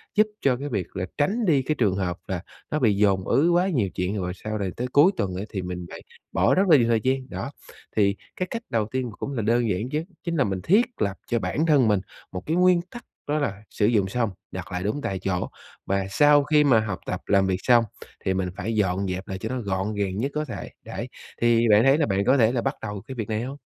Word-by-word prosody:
giúp 215 +1 +5
cho 130 -3 +2
cái 145 +3 -5
việc 100 -8 -2
là 90 - -2
tránh 210 +11 +1
đi 150 -7 +4
cái 155 +4 -1
trường 105 -9 +2
hợp 90 -2 -2
là 95 -3 -3 0.3
nó 150 - +1
bị 115 -7 +3
dồn 100 -2 +2
ứ 155 +5 +3
quá 175 +2 +3
nhiều 120 - +1
chuyện, 90 +3 -1
rồi 90 -2 -2
sau 110 +3 -5
rồi 100 -3 -2
tới 125 - -2
cuối 145 +8 +5
tuần 95 - -1
á 95 - -3
thì 95 - -3
mình 90 -1 -5
lại - - -9 0.3
bỏ - - +3
rất 190 - +4
là 155 - +8
nhiều 120 -3 +3
thời 115 -2 +2
gian, 130 0 0
đó. 140 - -5 0.4
Thì 100 -2 +3 0.2
cái 185 - -2
cách 230 -1 -4
đầu 115 -2 +1
tiên 130 -1 -1
và 105 - -11
cũng 140 - -4
là 120 - -1
đơn 115 +2 +2
giản 105 +5 -1
nhất 150 +4 -2 0.2
chính 170 -2 -2
là 145 - +3
mình 95 -5 -2
thiết 210 - +4 0.2
lập 100 -2 0
cho 120 - +1
bản 155 +7 -1
thân 145 -7 +4
mình 105 -2 +3 0.3
một 90 0 -5
cái 160 - 0
nguyên 180 -1 +4
tắc, 240 - -10 0.2
đó 150 +1 +1
là 105 -8 -3
sử 105 - 0
dụng 105 -3 +3
xong, 115 +1 0 0.2
đặt 95 0 -7
lại 90 0 -3
đúng 110 +9 -1
tại 95 -8 -3
chỗ, 90 -1 -2 0.4
và 100 0 0
sau 145 +6 +5
khi 150 +1 +4
mà 130 -6 +5
học 105 -4 -3
tập, - - -3
làm 100 -1 +3
việc 95 -1 0
xong 120 -2 +5 0.4
thì 95 - +2
mình 95 -1 -1
phải 110 +5 -2
dọn 95 -2 +1
dẹp 90 +1 -4
lại 95 - -4
cho 110 +4 -5
nó 130 0 -2
gọn 100 0 -2
gàng 100 -2 -1
nhất 135 +6 -1
có 150 0 -1
thể, 105 - -7 0.2
đấy. - - -5 0.3
Thì 120 0 +4
bạn 105 +2 +6
thấy 135 +2 +5
là 155 - +2
bạn 100 -1 0
có 130 +2 +4
thể 115 -3 +4
là 125 -2 0
bắt 135 +3 -1
đầu 105 -2 -5
cái 130 - -6
việc 110 -3 -4
này 110 0 -1
hông? 135 +3 -6
110 Hz, 270 wpm, -25 LUFS, 95-140 Hz, 0.4 s, là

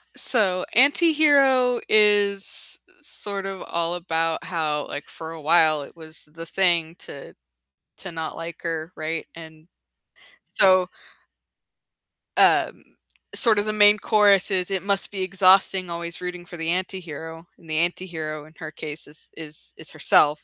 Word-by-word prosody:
So 190 -7 0
"Anti-Hero" 280 -3 +4
is 205 -2 +2
i - - -23
sort 200 -9 -6
of, 195 -1 -6
all 170 +1 -2
about 165 -2 -2
how, 155 -4 -3
like, 145 - -8
for 160 0 -9
a 165 -1 -9
while 155 -1 +3
it - - -14
was 160 -1 -13
the 165 +2 -11
thing 170 -2 +1
to 140 - -11 0.7
to 190 - -7
not 160 -1 -6
like 165 0 -8
her, 165 0 -4
right, 160 +1 -4
and 160 -1 -13 0.8
so 185 -2 +3 1.5
um, - - +3 0.5
sort 220 -3 +3
of, 205 - -1
the 215 - -2
main 210 0 +5
chorus 205 -2 +3
is, 185 0 -1
"It 190 -1 -2
must 200 -1 -2
be 195 -2 -5
exhausting 185 0 +3
always 170 0 -6
rooting 180 -1 -6
for 175 - -11
the 165 0 -3
anti-hero," 165 -3 -5
and 165 - -19
the 155 - -1
anti-hero 160 -3 -3
in 155 - -18
her 160 -3 -7
case 155 0 -8
is 150 +1 -15
is 155 -1 -11
is - - -11
herself, 150 +1 +2
175 Hz, 150 wpm, -23 LUFS, 160-195 Hz, 1.5 s, main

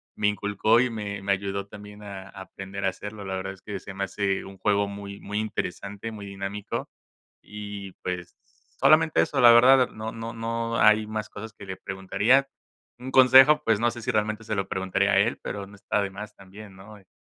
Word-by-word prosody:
me 105 - +1
inculcó 105 +2 +2
y 125 +1 +2
me 100 -3 -5
me 100 - 0
ayudó 100 0 -2
también 105 0 -12
a 95 -2 -8
aprender 95 0 -7
a - - +4
hacerlo. 105 +2 -8
La 95 0 -3
verdad 95 +1 -4
es 95 - -18
que 100 -2 -6
se 95 - -10
me 100 +1 -2
hace 95 0 -1
un 95 0 -11
juego 100 0 +1
muy 100 0 -8
muy 105 +1 -4
interesante, 105 0 -4
muy 105 -2 -8
dinámico 100 +1 -5 0.5
y, 100 -2 -8
pues, 90 -1 -5 0.4
solamente 155 +4 +5
eso 140 -3 0
la 120 -1 +9
verdad, 130 +3 +7
eh, - - -3
no 110 +1 -6
no 115 0 -6
no 115 0 -3
hay 110 0 +5
más 110 0 -4
cosas 110 +1 -8
que 100 - -12
le 95 -1 -6
preguntaría. 100 +8 +1 0.5
Un 130 +1 -7
consejo 130 +4 +7
pues, 115 -5 +2
no 120 +1 +2
sé 120 0 -9
si - - -4
realmente 110 +1 0
se 110 -1 -3
lo 95 -1 -2
preguntaría 95 0 0
a - - +3
él - - +1
pero 100 -1 -5
no 100 - -14
está 105 +1 -1
de 100 - -2
más 100 +2 -9
también 100 +1 -13
¿no? 100 +3 -13
Eh. 95 -2 -22
105 Hz, 215 wpm, -26 LUFS, 100-110 Hz, 0.5 s, la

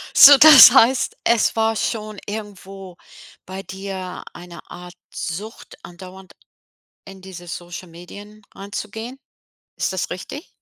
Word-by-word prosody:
So, 285 0 +9
das 300 -4 +9
heißt, 260 0 +2
es 235 -1 0
war 225 0 -1
schon 215 -1 -5
irgendwo 195 -3 -10 0.5
bei 190 +1 -9
dir 190 0 -9
eine 175 0 -13
Art 180 0 -12 0.2
Sucht, 205 +7 -9
andauernd 185 +2 -14 0.7
in 195 -1 -14
diese 185 -2 -13
Social-Medien 175 +3 -11 0.3
reinzugehen. 220 +5 -9 0.6
Ist - - -3
das 185 - -4
richtig? 275 - -9
195 Hz, 115 wpm, -19 LUFS, 180-220 Hz, 0.7 s, So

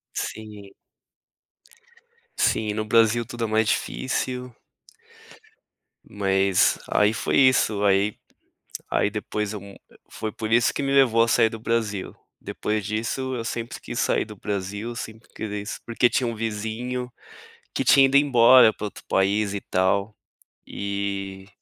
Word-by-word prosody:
Sim. 105 -2 -6 1.7
Sim, 105 -1 +1
no 110 0 -2
Brasil 115 +1 +3
tudo 120 -1 -4
é - - +1
mais 110 0 +1
difícil. 125 -1 -2 1.5
Mas 95 -1 +2
aí 105 +1 +3
foi - - -1
isso, 125 -6 +3
aí 100 +1 +2 0.7
aí 105 - +1
depois 105 0 -3
eu 105 - -6
mu 100 0 -12 0.4
foi 110 -1 -5
por 110 0 -5
isso 120 0 +4
que - - -3
me 135 0 -1
levou 120 -5 +4
a 115 - +2
sair 115 -1 +4
do 115 - -8
Brasil, 110 -4 -2 0.3
depois 105 -1 -3
disso 115 +5 -3
eu 115 - -4
sempre 120 0 -5
quis - - -6
sair - - +1
do 105 -1 -11
Brasil, 100 +4 -4
sempre 110 0 -8
queria 105 -1 -4
isso 105 - -6
porque 120 +1 +2
tinha 125 - 0
um 115 - -2
vizinho, 115 +3 -4 0.6
que - - -1
tinha 135 -1 +6
ido 135 +1 +2
embora 125 -4 +6
para 105 - -6
outro - - -10
país 100 +1 +1
e 100 - -3
tal, 100 +3 0 0.5
e 100 -1 -4
110 Hz, 145 wpm, -24 LUFS, 100-115 Hz, 1.7 s, tinha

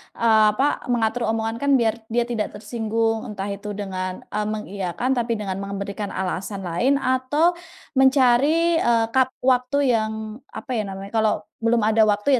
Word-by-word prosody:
eee 220 -2 +4
apa, 275 +7 0
mengatur 235 +1 0
omongan 225 0 -2
kan 280 0 +2
biar 225 -2 +2 0.2
dia 240 0 +3
tidak 225 -4 -2
tersinggung, 225 +1 -1
entah 200 -1 -4
itu 200 +1 -6
dengan, 185 -2 -4
eee, 210 0 -1
mengiyakan, 200 +3 -3
tapi 235 -1 0
dengan 195 -3 -4
memberikan 200 +1 -4
alasan 190 +1 -4
lain 245 +12 +2
atau 270 +5 +2 0.5
mencari, 280 +6 +4
eee, 230 -1 +3
kap 260 -1 +4 0.2
waktu 255 +1 +2 0.2
yang 220 -1 0 0.4
apa 260 - -8
ya - - +1
namanya, 195 +1 -7
kalau 220 -1 +3 0.3
belum 230 0 +2
ada 220 +1 +3
waktu 210 +6 +3
225 Hz, 155 wpm, -23 LUFS, 205-250 Hz, 0.5 s, eee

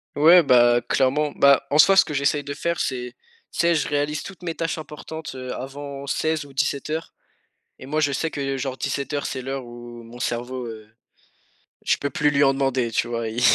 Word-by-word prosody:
Ouais, 170 +4 +7
bah, 120 -3 +5
clairement. 145 +3 +1
Bah, 140 -1 +4
en 145 - +2
soi, 195 +6 +7
ce 190 - +7
que 150 - -7
j'essaye 140 +1 +1
de 140 0 -5
faire, 170 +1 -2
c'est, 125 -2 -3 0.4
tu - - -9
sais, 170 0 +4
je 150 - 0
réalise 145 +1 -1
toutes 190 -2 -10
mes 170 -2 -4
tâches 165 -1 -2
importantes, 155 -1 -8
heu, 130 -1 -5
avant 140 +1 -7
16 155 +1 -1
ou 140 - -15
17:00 150 +3 -2 0.7
et - - -9
moi, 150 +3 -2
je 145 -2 +1
sais 160 +4 -1
que, 135 -2 -3
genre, 130 -1 -3
17:00, 140 +2 -3
c'est 130 - -4
l'heure 135 0 -4
où 120 0 -10
mon 115 +1 -12
cerveau, 125 +1 -3
heu, 110 -2 -9 1.0
je - - +3
peux 145 - -2
plus 150 0 +2
lui 140 0 +2
en 135 - +5
demander, 135 -3 0
tu 115 - 0
vois? 115 -1 -2
Il 110 +2 -4
140 Hz, 210 wpm, -23 LUFS, 125-150 Hz, 1.0 s, Ouais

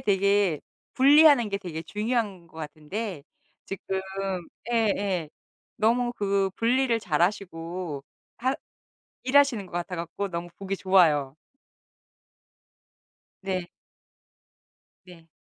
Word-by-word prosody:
되게 200 -4 +2 0.3
분리하는 285 -3 +7
게 200 -1 -2
되게 165 -4 -6
중요한 210 -4 -2
것 160 - -19
같은데 160 +4 -5 0.4
지금 190 0 -3 0.7
예예 200 -7 +1 0.5
너무 240 +2 +2
그 195 -1 +1
분리를 240 0 +2
잘하시고 170 -3 -1 0.4
하 260 +3 +1 0.7
일하시는 260 -6 +3
것 - - -18
같아 175 +1 -3
갖고 170 +4 -4
너무 170 0 -4
보기 195 0 -3
좋아요. 155 -8 +3 2.1
네. 185 -2 -3 1.3
네. 175 -3 -15
195 Hz, 190 characters per minute, -26 LUFS, 170-225 Hz, 2.1 s, 분리하는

